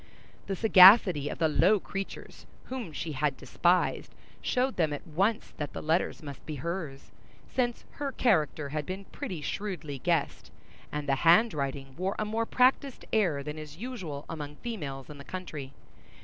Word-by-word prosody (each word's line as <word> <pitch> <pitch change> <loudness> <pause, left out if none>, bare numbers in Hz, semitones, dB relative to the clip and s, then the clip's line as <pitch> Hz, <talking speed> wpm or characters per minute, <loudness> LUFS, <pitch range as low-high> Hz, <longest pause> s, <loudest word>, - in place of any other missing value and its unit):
The 195 - -1
sagacity 185 -7 +7
of - - -5
the 165 - +3
low 185 +7 +4
creatures 195 +1 -7 0.2
whom 250 -9 -5
she 155 +2 -4
had 145 -1 -1
despised 175 +7 +1 0.3
showed 255 +1 0
them 160 -4 +1
at 145 - -6
once 195 +8 0
that 145 -1 -4
the - - -5
letters 160 +1 0
must 140 -3 -8
be 155 - -4
hers, 155 -2 -5 0.4
since 240 -2 -1
her 285 -1 -2
character 155 - +1
had 150 +1 -2
been 190 +2 -5
pretty 180 -4 -6
shrewdly 170 -6 -4
guessed, 165 0 -1 0.4
and 150 0 -4
the 135 -1 +2
handwriting 145 - +2
wore 190 +2 -1
a 215 - -1
more 225 +2 -1
practised 260 +1 +2
air 175 -10 +2
than 150 +2 -6
is 155 0 -9
usual 185 - -6
among 150 -3 -6
females 150 - -6
in 150 -2 -11
the - - -9
country. 155 -6 -7
165 Hz, 165 wpm, -29 LUFS, 145-205 Hz, 0.4 s, sagacity